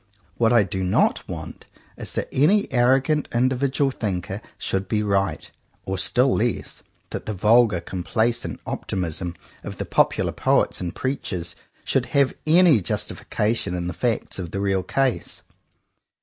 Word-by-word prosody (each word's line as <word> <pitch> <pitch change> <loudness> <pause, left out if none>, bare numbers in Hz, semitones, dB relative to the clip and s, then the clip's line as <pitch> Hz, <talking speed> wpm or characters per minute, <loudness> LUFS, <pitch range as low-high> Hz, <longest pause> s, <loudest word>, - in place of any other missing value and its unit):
What 115 -1 +3
I 120 -3 +5
do 95 0 -4
not 90 - +1
want - - -7 0.3
is - - -6
that - - -2
any 190 +10 +3
arrogant 135 +4 +3
individual 130 +3 +1
thinker 95 -3 -3 0.2
should 95 0 -2
be 105 +2 0
right; 100 -1 -1 0.3
or, 95 - -2
still 125 +6 +2
less, 120 +1 -2 0.3
that - - -5
the 105 - -2
vulgar 105 0 +4
com 90 +1 -5
placent 120 +4 -1
optimism 90 -1 -3 0.3
of - - -7
the - - -3
popular - - +2
poets - - +1
and 90 0 -4
preachers 95 - -3 0.3
should - - 0
have 140 -1 +4
any 165 - +6
justification 105 +2 -1
in 90 -1 -3
the 90 - -3
facts 115 0 -1
of 90 -2 -4
the 100 - -4
real 95 -1 +1
case. 130 +7 -1
110 Hz, 150 wpm, -23 LUFS, 95-130 Hz, 0.3 s, any